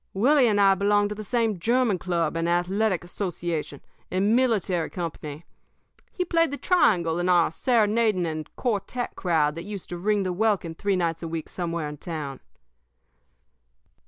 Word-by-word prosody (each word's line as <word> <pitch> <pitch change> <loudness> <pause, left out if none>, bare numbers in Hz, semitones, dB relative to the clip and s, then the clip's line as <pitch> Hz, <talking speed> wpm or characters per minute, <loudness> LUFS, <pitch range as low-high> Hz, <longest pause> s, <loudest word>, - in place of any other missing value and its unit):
Willie 260 +5 +4
and 205 -2 +2
I 195 -1 +6
belonged 205 +1 +2
to 210 - -4
the 215 - -6
same 225 -3 0
german 235 -1 +2
club 170 -3 -1
and 165 +1 0
athletic 185 +3 +1
association 175 -5 -4 0.3
and 200 +4 +2
military 205 -10 +1
company. 160 -3 -6 0.7
He 360 - -2
played 330 -2 +2
the 285 - -4
triangle 175 - +2
in 175 +1 0
our 175 -3 +4
serenading 220 -3 +2
and 155 -2 -4
quartet 240 +1 -2
crowd 160 -5 +1
that 165 +2 -7
used 200 -1 -7
to 175 - -5
ring 205 +3 +1
the 185 -1 -2
welkin 200 -4 0
three 200 +4 -1
nights 165 -2 -1
a 165 - -4
week 160 -1 -5
somewhere 170 -3 -3
in 150 0 -7
town. 150 -4 -5
185 Hz, 160 wpm, -25 LUFS, 170-215 Hz, 0.7 s, I